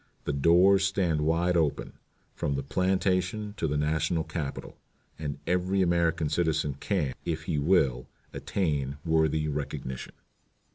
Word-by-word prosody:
The 75 - -2
doors 90 +7 +5
stand 90 -5 +1
wide 85 +3 +1
open, 80 -4 0 0.4
from 70 - -2
the 70 - -2
plantation 95 +5 0
to 80 - 0
the 75 0 -1
National 80 +2 0
Capitol, 75 -4 -6 0.4
and 75 -2 -4
every 90 +2 +1
American 85 -2 +1
citizen 80 -2 0
can, 85 -10 -1
if 80 -2 -3
he 80 -6 -1
will, 70 -6 +2 0.3
attain 70 -7 -2
worthy 80 -1 +2
recognition." 70 -3 -5
80 Hz, 130 wpm, -28 LUFS, 75-90 Hz, 0.4 s, doors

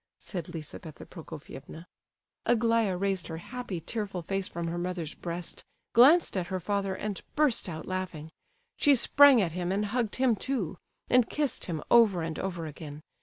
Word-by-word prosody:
said 175 -5 -5
Lizabetha 160 -1 -8
Prokofievna. 160 -1 -10 0.6
Aglaya 230 -4 +3
raised 195 -1 -1
her 160 - -5
happy, 225 0 -5
tearful 195 0 -4
face 195 +2 -1
from 170 0 -4
her 170 +1 -2
mother's 175 -3 -3
breast, 170 0 -5 0.3
glanced 285 +7 +6
at 180 -2 -1
her 185 - -2
father, 195 0 -1
and 205 -1 -4
burst 290 -10 +2
out 160 -2 -6
laughing. 180 -4 -4 0.5
She 285 -1 +5
sprang 270 -1 +6
at 170 - -1
him 175 +1 -2
and 205 +2 0
hugged 225 0 -1
him 255 -3 +3
too, 195 - -2 0.3
and 250 -2 +4
kissed 295 -5 -1
him 160 -4 -4
over 210 -8 +6
and 160 -1 -4
over 175 -4 -3
again. 150 -1 -8
185 Hz, 165 wpm, -29 LUFS, 170-230 Hz, 0.6 s, glanced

